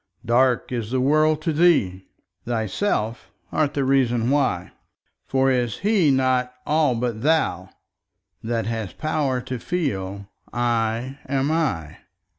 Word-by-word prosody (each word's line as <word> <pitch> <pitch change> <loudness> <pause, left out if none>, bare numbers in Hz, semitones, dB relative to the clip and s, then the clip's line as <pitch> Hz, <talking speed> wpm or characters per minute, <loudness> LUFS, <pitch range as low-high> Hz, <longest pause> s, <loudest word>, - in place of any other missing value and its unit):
Dark 125 +2 +2
is 115 -4 -3
the 130 +1 0
world 155 +3 +2
to 165 - 0
thee: 145 - +2 0.4
thyself 115 - -2 0.2
art 155 -2 0
the 140 - +1
reason 125 -3 +2
why; 135 -11 0 0.6
For 135 0 +2
is 120 -4 0
He 200 -6 +2
not 130 -2 +2
all 150 -4 +2
but 115 -2 -2
thou, 160 +4 +1 0.7
that 115 -1 -2
hast 110 -3 -4
power 150 -5 -1
to 125 -1 -5
feel 100 - -3 0.2
'I 120 +2 -1
am 135 +2 0
I'? 135 - -1
130 Hz, 125 wpm, -23 LUFS, 115-145 Hz, 0.7 s, Dark